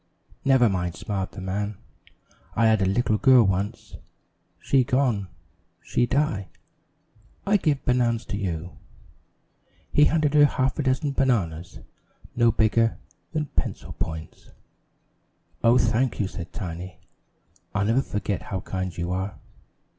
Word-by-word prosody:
"Never 130 -3 +5
mind," 90 -4 -1
smiled 100 -3 -4
the 100 - -8
man, 100 +2 -3 0.8
"I 115 - +3
had 110 -2 +4
little 105 +1 +1
girl 130 -4 +7
once. 100 +3 -2 0.6
She 135 -2 +3
gone. 120 -6 +1 0.6
She 120 - +1
die. 140 -9 0 1.0
I 205 +1 +4
give 150 -7 0
banan's 120 -2 +1
you." 90 -4 -4 1.1
He 150 - +6
handed 155 -3 +2
her 150 - +6
a - - +9
half 130 -2 0
dozen 140 0 0
bananas 95 -12 -1 0.5
no 120 -1 +4
bigger 115 +1 +2 0.4
than 155 -1 0
pencil - - -3
points. 80 -1 -6 1.1
"Oh, 115 +2 +6
thank 120 +1 +1
you," 100 - +1
said 90 -3 -8
Tiny. 90 -2 -6 0.8
"I'll 105 -1 +1
never 115 +5 +3
forget 105 -5 -3
how 95 -3 -4
kind 95 -3 -4
you 85 +1 -2
are." 95 +2 -3
110 Hz, 125 wpm, -25 LUFS, 95-130 Hz, 1.1 s, a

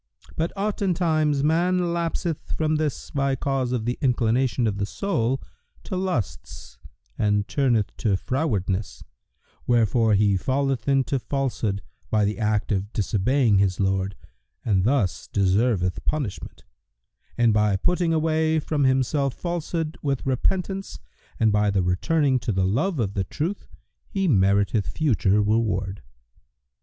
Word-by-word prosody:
But 165 +2 -1
oftentimes 170 -8 +1
man 175 +3 +2
lapseth 170 -1 -3
from 155 -1 +1
this 150 -3 -3
by 140 -1 0
cause 135 -1 -1
of 120 -3 -1
the 120 +1 -2
inclination 125 -1 +1
of 105 -2 -1
the 100 - 0
soul 135 - -1 0.4
to - - -5
lusts 120 - -4 0.4
and 105 -1 +1
turneth 120 -7 +1
to 100 -4 +1
frowardness, 100 - -2 0.6
wherefore 115 -2 +3
he 100 -1 +3
falleth 135 +4 -1
into 135 -1 +2
Falsehood 120 -7 -2 0.3
by 105 -1 +2
the 105 +3 -2
act 105 -1 0
of 100 +1 -1
disobeying 110 +2 +2
his 95 -2 +1
Lord 95 0 0 0.5
and 95 -4 +2
thus 120 - 0
deserveth 95 -1 +1
punishment; 140 -10 -4 0.7
and 120 -2 +4
by 105 -1 +2
putting 175 - +1
away 160 0 +1
from 150 -2 0
himself 135 +1 +1
Falsehood 170 -2 -3
with 140 -3 -2
repentance 190 +9 -1 0.4
and 110 -1 +4
by 105 0 +2
the 100 -2 +1
returning 130 - +1
to 115 - -2
the 95 -2 +1
love 145 - 0
of 105 -6 -1
the 100 - -1
Truth, 165 - -4 0.4
he 195 -3 -1
meriteth 100 - +2
future 105 -9 +2
reward." 105 -3 0
125 Hz, 130 wpm, -24 LUFS, 105-155 Hz, 0.7 s, and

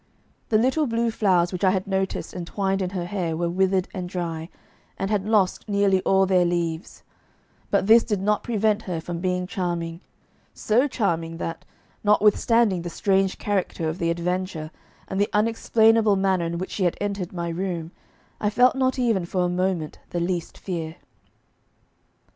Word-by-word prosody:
The 215 - +4
little 265 +6 +2
blue 230 0 0
flowers 185 -5 +2
which 180 - -4
I 190 - +6
had 190 0 0
noticed 190 -1 -2
entwined 195 +2 -2
in 185 - -1
her 180 -2 -4
hair 175 -4 -2
were 170 0 -1
withered 190 +1 +1
and 180 -2 -5
dry, 165 -2 -4 0.5
and 195 +2 -2
had 205 -1 0
lost 210 -1 +1
nearly 200 -2 +3
all 195 0 +3
their 185 -1 +3
leaves, 170 -1 -2 0.7
but - - +2
this 225 +3 +7
did 210 -4 -1
not 210 +2 +1
prevent 220 -2 +1
her 180 -6 -4
from 170 +1 -5
being 180 0 -1
charming 175 -3 -3 0.5
so 240 +6 +2
charming 170 - -1
that, 165 0 -5 0.4
notwithstanding 210 -1 +3
the 175 - -5
strange 195 +2 +1
character 190 -5 -1
of 160 +4 -3
the 170 -2 0
adventure, 170 -2 -2 0.4
and 190 +1 -1
the 205 - +2
unexplainable 225 0 +3
manner 190 -3 +1
in 170 0 -3
which 185 +2 -5
she 190 - -1
had 175 - 0
entered 200 -3 -3
my 170 -2 -3
room, 170 -1 -3 0.5
I 210 - +1
felt 250 +5 +4
not 260 0 +1
even 230 -7 +1
for 180 +1 0
a - - 0
moment 180 -3 -1
the 175 - -2
least 175 -1 -2
fear. 165 -4 -5
190 Hz, 170 wpm, -24 LUFS, 175-210 Hz, 0.7 s, this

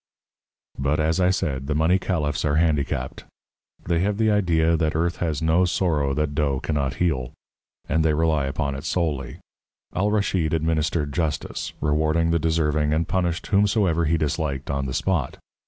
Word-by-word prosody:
But, 70 +3 0
as 80 +3 +1
I 90 0 +4
said, 70 -8 -1
the 75 - -1
money 80 +5 +3
caliphs 75 -6 -1
are 75 -1 +1
handicapped. 75 -5 0 0.6
They 85 -1 +1
have 100 +3 0
the 110 -1 +2
idea 85 -5 +2
that 80 -1 0
earth 85 +2 0
has 80 -3 -2
no 80 +3 +3
sorrow 80 -6 0
that 75 -1 -1
dough 70 -3 0
cannot 70 -4 -2
heal; 65 -8 -1 0.5
and 80 +3 +1
they 80 -1 +2
rely 80 -3 +1
upon 70 +1 -2
it 70 +1 -6
solely. 80 -5 -2 0.6
Al 100 +3 +1
Raschid 95 -6 +1
administered 80 -2 0
justice, 80 -4 -3
rewarding 80 +2 +1
the 85 - +2
deserving, 75 -2 +1
and 80 +1 0
punished 90 -2 -1
whomsoever 100 -5 +2
he 80 +2 +2
disliked 75 -3 -2
on 70 -1 -2
the 65 - -4
spot. 85 -7 -1
80 Hz, 165 wpm, -23 LUFS, 75-85 Hz, 0.6 s, I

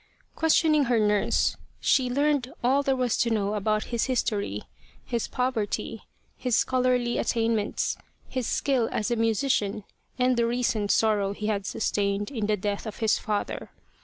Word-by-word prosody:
Questioning 315 -2 +3
her 240 -1 +2
nurse, 210 -1 +2 0.2
she 255 -2 +2
learned 280 -1 +1
all 265 +3 +3
there 275 -1 +1
was 250 -2 +1
to 235 - +2
know 210 -2 0
about 215 +1 0
his 235 - +1
history, 210 - -1 0.4
his 235 -2 -2
poverty, 225 -3 -2 0.3
his 250 -3 0
scholarly 250 -2 +1
attainments, 225 -3 0 0.3
his 255 -3 -3
skill 260 -5 +1
as 215 +3 -1
a - - +2
musician 225 -2 0 0.3
and 250 -1 +2
the 235 0 +2
recent 235 -4 0
sorrow 205 -3 +2
he 210 - -6
had 205 -2 -1
sustained 205 +1 -1
in 220 -6 -2
the 210 -1 +1
death 205 +2 -3
of 215 - -6
his 220 -2 +2
father. 210 -2 -3
230 Hz, 155 wpm, -26 LUFS, 210-255 Hz, 0.4 s, Questioning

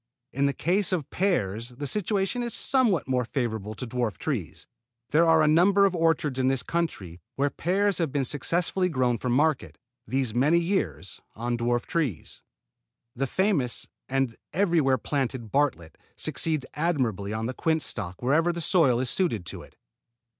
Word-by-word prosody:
In 140 +3 +2
the 140 - 0
case 190 +7 0
of 170 -7 -2
pears 115 - 0
the 130 +4 -7
situation 205 - -1
is 235 -2 -1
somewhat 230 - +2
more 130 -1 +1
favorable 110 -4 -3
to 125 - -5
dwarf 120 -6 -2
trees. - - -4 0.5
There 165 +3 +4
are 160 -1 +5
a - - +3
number 190 +6 +5
of 190 -2 +1
orchards 160 -5 +1
in 130 - +2
this 130 -2 +1
country 100 - -3
where 140 +1 +1
pears 195 +2 0
have 165 -5 0
been 140 -1 0
successfully 175 +7 0
grown 125 -6 +1
for 125 - -2
market, 145 +4 +1 0.3
these 130 -1 -1
many 140 +8 +3
years, 100 - -2
on 120 +2 -2
dwarf 120 +1 0
trees. 140 - -3 0.7
The 135 +2 -1
famous 175 - 0 0.2
and 135 -3 0 0.2
everywhere 165 -7 +3
planted 130 -3 -3
Bartlett 140 - 0 0.2
succeeds 155 -5 -1
admirably 130 - -1
on 110 +1 -2
the 125 - -2
quince 160 +3 0
stock 95 -1 -6
wherever 160 +7 +3
the 170 - -5
soil 155 -8 +3
is 130 - -1
suited 115 - 0
to - - -7
it. - - -16
140 Hz, 165 wpm, -26 LUFS, 120-170 Hz, 0.7 s, are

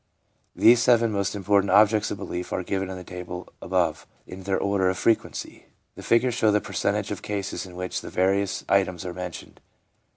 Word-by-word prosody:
These 120 +1 +6
seven 115 -2 +4
most 100 0 -1
important 100 0 +2
objects 105 0 +4
of - - -4
belief 90 -2 -5
are 90 - -2
given 95 0 -2
in 95 - -6
the 90 - -8
table 90 0 -8
above 90 -4 -1 0.2
in 95 - -9
their 95 -1 +1
order 100 -2 +1
of 95 - -2
frequency. 115 +3 -1 0.3
The - - -11
figures 120 +1 +2
show 110 -2 +2
the 105 - +3
percentage 105 0 -2
of 100 - -4
cases 100 -1 -4
in 90 - -12
which 90 0 -4
the - - -8
various 95 +1 0
items 95 -2 +1
are 90 - -4
mentioned. 90 -2 -8
100 Hz, 190 wpm, -25 LUFS, 90-105 Hz, 0.3 s, These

